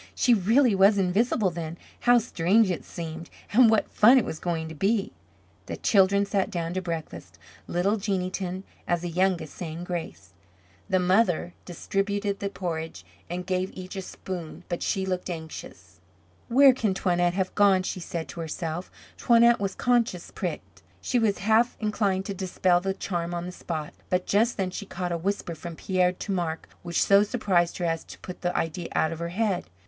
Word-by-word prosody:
She 245 - +4
really 230 +4 +4
was 195 +2 +5
invisible, 195 +2 +2
then. 165 0 -6 0.2
How 245 0 +5
strange 210 -2 +2
it 175 - -3
seemed 165 -1 -7 0.2
and 240 +1 +7
what 220 -1 +3
fun 240 +5 +6
it 245 - +3
was 155 - -5
going 165 -2 -2
to - - -7
be. 205 +6 0 0.6
The - - -5
children 200 0 +3
sat 200 -1 0
down 170 -4 -3
to 185 - -2
breakfast, 165 -3 -6 0.3
little 195 +5 +1
Jeanneton, 185 -2 -2 0.2
as 175 -1 +1
the 175 - -3
youngest, 175 -3 0
saying 165 -1 -6
grace. 165 - -6 0.6
The 190 - +3
mother 180 -1 +2
distributed 200 +3 -2
the 200 - -2
porridge 165 -4 -5 0.2
and 180 +1 -4
gave 185 0 -1
each 185 +1 -8
a 190 - -3
spoon 180 -2 -7
but 175 - -3
she 190 -2 0
looked 185 -1 -3
anxious. 160 - -8 0.5
"Where 270 +2 +7
can 215 -6 0
Toinette 175 -2 +1
have 190 -1 -1
gone?" 195 -2 +4
she 185 - -3
said 170 -2 -5
to - - -8
herself. 165 +1 -4 0.3
Toinette 235 0 +5
was 195 -1 -2
conscious 235 -8 0
pricked. - - -6 0.2
She 250 - 0
was 215 -3 +2
half 225 +3 +3
inclined 200 -3 0
to 200 - -3
dispel 185 -1 +1
the 190 +1 -2
charm 175 -3 -3
on 170 0 -3
the 180 - -5
spot. 160 -4 -5 0.2
But 180 0 +1
just 225 +4 +2
then 190 -2 -1
she 200 +2 -6
caught 180 -2 -4
a - - 0
whisper 195 -1 -2
from 165 +1 -8
Pierre 180 +1 +1
to 195 - -6
Marc 170 -4 -2
which 170 -1 0
so 200 0 +6
surprised 200 -6 +1
her 175 - -2
as 165 -1 -1
to - - -11
put 180 - -9
the 175 0 -1
idea 165 +1 -2
out 160 - +2
of 165 - -6
her 170 0 -3
head. 190 -1 -1
185 Hz, 185 wpm, -26 LUFS, 175-200 Hz, 0.6 s, and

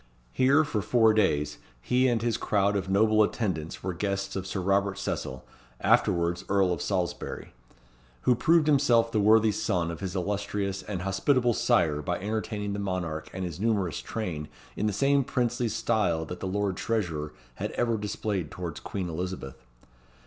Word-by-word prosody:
Here, 140 +4 +4
for 130 -9 -2
four 110 +1 +4
days, 75 -9 +1 0.2
he 125 - +2
and 115 -3 +1
his 120 -2 +1
crowd 100 -2 +1
of 95 -1 -2
noble 110 +2 +4
attendants 95 -8 -1
were 95 -1 -2
guests 100 +2 -2
of 95 -1 -3
Sir 95 - -3
Robert 100 +1 +1
Cecil, 65 -9 -4 0.3
afterwards 85 0 +2
Earl 95 -2 +3
of 85 - -4
Salisbury, 90 -3 -3 0.7
who 125 - +4
proved 160 +6 +3
himself 125 -6 +4
the 110 - +1
worthy 110 +1 +5
son 85 -4 -1
of 85 - -7
his 95 -1 -4
illustrious 100 +1 -2
and 95 -2 -5
hospitable 120 +6 +2
sire 85 -12 +2
by 90 +2 -2
entertaining 105 0 -3
the 100 - -3
monarch 90 -5 -3
and 95 0 -4
his 85 -1 -6
numerous 100 -5 0
train 85 -9 -4 0.3
in 105 - 0
the - - +1
same 140 +6 +2
princely 120 -2 0
style 90 -7 0
that 90 - -7
the 95 - -4
Lord 100 0 -1
Treasurer 85 -10 -2 0.3
had - - -2
ever 115 -1 +1
displayed 105 -5 -3
towards 85 -3 -6
Queen 95 -3 -4
Elizabeth. 85 -5 -5
100 Hz, 165 wpm, -28 LUFS, 90-110 Hz, 0.7 s, worthy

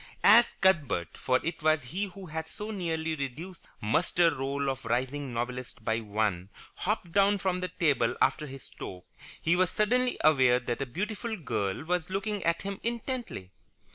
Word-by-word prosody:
As 235 +4 +7
Cuthbert, 145 - +2
for 130 0 +1
it 165 +1 -3
was 155 -2 +3
he 180 +12 -2
who 195 0 -10
had 160 -1 -5
so 210 +5 -6
nearly 165 -5 -2
reduced 155 +6 -5
the - - -25 0.2
muster 165 +8 +3
roll 140 +1 -2
of 135 -1 -2
rising 130 +4 -1
novelists 125 +1 -4
by 110 -1 -1
one, 105 -4 -1 0.2
hopped 190 -4 -2
down 200 +2 +4
from 185 -1 -1
the 185 - -2
table 150 -9 +1
after 150 - +2
his 135 -1 -9
stroke, 90 -1 -9 0.3
he 170 - +2
was 185 -1 +3
suddenly 250 +4 +1
aware 130 -5 +5
that 125 +1 -3
a 135 - -2
beautiful 210 - -3
girl 110 - -2
was 175 0 -1
looking 200 +1 -2
at 170 0 +1
him 195 0 -4
intently. 235 - -4
160 Hz, 170 wpm, -29 LUFS, 125-190 Hz, 0.3 s, As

